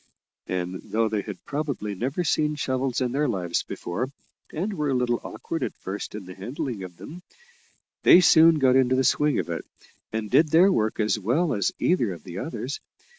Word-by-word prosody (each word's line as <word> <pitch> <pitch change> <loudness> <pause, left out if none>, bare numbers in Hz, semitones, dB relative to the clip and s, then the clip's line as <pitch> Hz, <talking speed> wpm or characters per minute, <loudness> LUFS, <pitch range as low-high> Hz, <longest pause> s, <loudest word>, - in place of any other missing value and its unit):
And 90 0 -3
though 115 +1 0
they 105 -1 -1
had 100 -2 -9
probably 140 -8 -3
never 130 - -2
seen 150 -2 +1
shovels 130 -2 -1
in 125 -1 0
their 145 +3 +1
lives 90 -6 -1
before, 110 +9 -4 0.4
and 195 +7 -2
were 150 -6 -1
a 135 - +1
little 125 -1 0
awkward - - -5
at - - -3
first 100 +2 -6
in 105 -3 -7
the 90 - -9
handling 120 - -5
of 90 -2 -9
them, 175 +4 -10 0.8
they 175 - +8
soon 165 -2 +6
got 130 -3 +4
into 130 -1 +4
the 130 - +2
swing 150 +3 +2
of - - -2
it, - - -3 0.5
and 110 -1 -3
did 155 0 +5
their 175 +6 +6
work 110 - 0
as 110 0 +1
well 140 - +1
as 100 -3 +1
either 120 - +1
of 85 - -12
the 90 0 -7
others. 145 -2 -4
125 Hz, 195 wpm, -25 LUFS, 105-150 Hz, 0.8 s, they